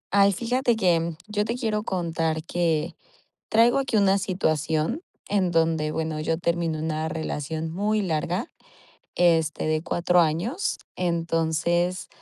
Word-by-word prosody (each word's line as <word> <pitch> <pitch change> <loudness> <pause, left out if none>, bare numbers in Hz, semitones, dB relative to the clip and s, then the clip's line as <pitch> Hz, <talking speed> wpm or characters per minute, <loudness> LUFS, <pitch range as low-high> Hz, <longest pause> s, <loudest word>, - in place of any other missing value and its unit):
Ay, 200 0 +6
fíjate 240 +4 +1
que 170 -5 +2
yo 210 0 0
te 230 +3 -2
quiero 220 -4 -1
contar 165 -5 -1
que 165 -1 -1 0.6
traigo 230 +2 +5
aquí 265 -5 +1
una 195 -1 +4
situación 165 - 0 0.3
en 195 -3 +1
donde, 160 -2 +1
bueno, 160 -1 -2
yo 160 +1 -1
termino 170 -2 -1
una 155 0 -2
relación 160 0 -3
muy 210 +5 0
larga, 175 +3 -1 0.6
este, 165 -3 +2
de 155 0 0
4 175 +1 +2
años. 175 - 0 0.2
Entonces, 170 +1 0
170 Hz, 130 wpm, -25 LUFS, 160-200 Hz, 0.6 s, Ay